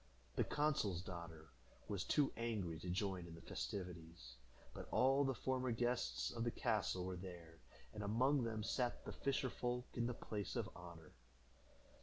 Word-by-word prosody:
The - - +4
consul's 125 - +2
daughter 85 -4 -7 0.4
was 100 -3 0
too 145 -3 +3
angry 105 -9 -1
to 90 - -4
join 95 -1 0
in 85 - -8
the 85 - -10
festivities, 80 -1 -5 0.4
but - - -6
all 135 +2 +5
the 135 -2 +2
former 130 +1 +1
guests 115 - +1
of 115 - -1
the 120 - +2
castle 90 -5 +1
were 95 0 -2
there, 85 -3 -8 0.3
and 105 - -4
among 125 +7 +4
them 110 -2 -1
sat 125 +2 0
the - - -3
fisher 135 -2 +1
folk 125 0 -1
in 120 -1 +1
the 125 - -1
place 105 -4 -3
of - - -1
honor. 85 -2 -9
100 Hz, 165 wpm, -42 LUFS, 85-125 Hz, 0.4 s, all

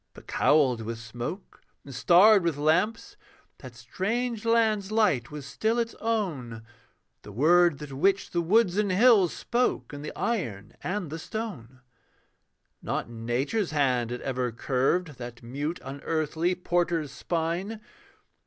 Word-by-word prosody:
But - - -14
cowled 135 -6 +3
with 115 +1 -5
smoke 120 - -7 0.2
and 140 - -9
starred 180 - +6
with 170 -4 -1
lamps 215 - 0 0.4
That 130 -3 -11
strange 220 - -3
land's 220 -3 +2
light 210 - +2
was 150 -2 -8
still 220 +12 -1
its 230 -1 -1
own; 155 - -2 0.6
The 105 - -11
word 165 - +4
that 145 -1 -8
witched 195 +8 +1
the 170 - +1
woods 190 +2 +3
and 210 -2 +1
hills 200 -3 +5
Spoke 245 -9 -1
in 145 - -7
the 150 - -6
iron 115 - -3
and 185 -4 -3
the 160 - -5
stone. 150 - -7 1.0
Not - - -3
Nature's 125 - -1
hand 130 -6 +1
had 125 0 -5
ever 125 -2 -2
curved 135 +6 -1
That 120 -1 -8
mute 145 +8 -4
unearthly 160 +5 -1
porter's 175 -4 -1
spine. 175 +6 -3
160 Hz, 135 wpm, -27 LUFS, 130-205 Hz, 1.0 s, starred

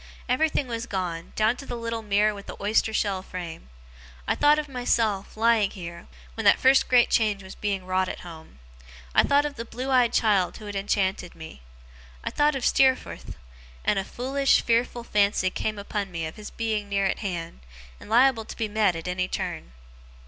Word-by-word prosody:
Everything 290 +3 +1
was 235 0 -4
gone, 175 -4 -4
down 220 +2 +2
to - - -8
the 245 - -4
little 230 -1 -3
mirror 210 0 +2
with 200 0 -10
the - - -7
oyster 215 +2 +1
shell 200 -3 0
frame. 170 - -8 0.6
I - - +3
thought 295 +1 +4
of 305 -1 -2
myself, 225 -6 -1
lying 225 -2 +3
here, 170 -3 -9 0.3
when 225 - -5
that 200 - +7
first 265 +1 +5
great 245 -1 +4
change 210 -4 +2
was 190 - -10
being 195 -3 -3
wrought 185 0 0
at - - -6
home. 160 - -12 0.6
I - - +6
thought 285 +1 +3
of 290 -1 -5
the 230 - -4
blue 250 +3 -5
eyed 250 -3 +4
child 205 -6 +2
who 215 - -11
had 205 -1 -6
enchanted 195 -2 -1
me. 160 - -11 0.6
I - - -3
thought 295 0 +2
of 265 - -2
Steerforth: 265 -1 +1 0.5
and 200 - +2
a - - -2
foolish, 270 +6 +1
fearful 235 +1 +1
fancy 200 -4 +2
came 215 +2 -3
upon 200 0 -4
me 165 -2 -3
of 160 - -7
his 210 -1 -8
being 215 -3 -2
near 200 -1 +1
at 190 - 0
hand, 175 - -5 0.4
and - - -13
liable 240 0 +4
to - - -9
be 225 - -1
met 210 -4 +2
at 165 +1 -6
any 185 0 -1
turn. - - -4
210 Hz, 195 wpm, -26 LUFS, 190-240 Hz, 0.6 s, that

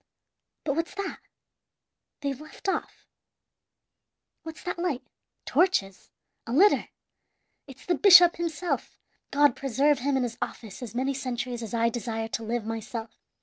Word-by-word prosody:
"But 280 -3 -1
what's 330 +3 -2
that? 400 0 -4 1.0
They've 280 -1 -3
left 310 +5 -10
off. 385 - -3 1.4
What's 320 -1 -9
that 355 -1 -4
light? 340 -8 -1 0.4
Torches! 200 - +1 0.4
a - - -4
litter! 390 +10 +5 0.8
It's 265 -1 -13
the 360 - +2
bishop 350 0 +8
himself! 340 0 -3 0.3
God 290 -3 +4
preserve 275 +2 +2
him 275 +2 +1
in 260 - +1
his 235 -2 -4
office 220 -1 -6
as 240 -2 -7
many 265 +3 0
centuries 250 -2 -4
as 225 0 -5
I 230 0 +3
desire 225 -1 -3
to 225 - -3
live 230 0 -2
myself! 225 0 -6
265 Hz, 140 wpm, -27 LUFS, 230-320 Hz, 1.4 s, bishop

